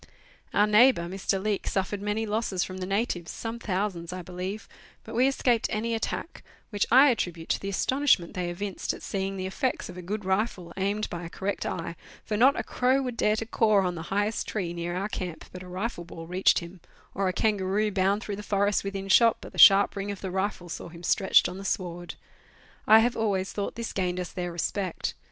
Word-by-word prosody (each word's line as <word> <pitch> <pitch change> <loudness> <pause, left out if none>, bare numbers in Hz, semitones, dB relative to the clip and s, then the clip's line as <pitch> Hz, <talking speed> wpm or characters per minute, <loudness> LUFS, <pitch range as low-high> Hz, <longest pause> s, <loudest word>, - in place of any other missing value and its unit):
Our 205 - +4
neighbour, 215 -1 +5
Mr. 190 +2 -2
Leake, 205 0 -2
suffered 195 +1 -1
many 210 +2 -1
losses 210 -3 -1
from 185 - -6
the 185 - -4
natives, 195 -4 -1
some 230 +1 -5
thousands 185 -5 -2
I 185 0 -6
believe, 185 +4 -5 0.4
but - - -10
we 250 +3 +4
escaped 245 -4 +2
any 230 +2 -1
attack, 225 +8 -4 0.3
which 205 -1 0
I 265 +4 +7
attribute 175 -7 -3
to - - +1
the 195 - -4
astonishment 255 -3 +2
they 180 -1 -2
evinced 190 +3 -3
at - - -13
seeing 195 0 -3
the 185 - -3
effects 250 +6 -2
of 180 - -9
a - - -6
good 205 +3 -4
rifle 190 -2 -1
aimed 200 +2 -1
by 175 0 -5
a 165 - -6
correct 195 +3 -3
eye, 170 0 -4 0.3
for 215 - -2
not 260 +6 +5
a - - -1
crow 260 +2 +1
would 250 -2 -4
dare 210 -2 +2
to 225 - -3
caw 215 -4 +3
on 180 - 0
the 165 - -6
highest 205 +3 0
tree 180 -5 -3
near 175 0 -4
our 195 +3 -1
camp 180 -5 -5
but 180 - -9
a 185 - -10
rifle 185 +1 -4
ball 165 -1 -9
reached 180 +3 +3
him, 170 +1 -11 0.3
or 195 -1 0
a - - +2
kangaroo 210 0 +1
bound 195 +2 +1
through 200 -2 -4
the - - -5
forest 205 0 +1
within 195 0 -4
shot 230 +4 +5
but - - -10
the - - -8
sharp 200 -1 +8
ring 200 0 -4
of 200 -2 -5
the 190 - -4
rifle 190 -1 -2
saw 170 - -6
him 170 +1 -12
stretched 190 +2 +4
on 180 +1 -7
the - - -7
sward. 175 -3 -3 0.7
I 220 +1 +8
have 240 +1 +1
always 195 -4 -1
thought 200 - -3
this 230 -1 -5
gained 180 -1 -1
us 180 - -4
their 175 -1 -4
respect. 180 +2 -2
195 Hz, 220 wpm, -27 LUFS, 180-215 Hz, 0.7 s, sharp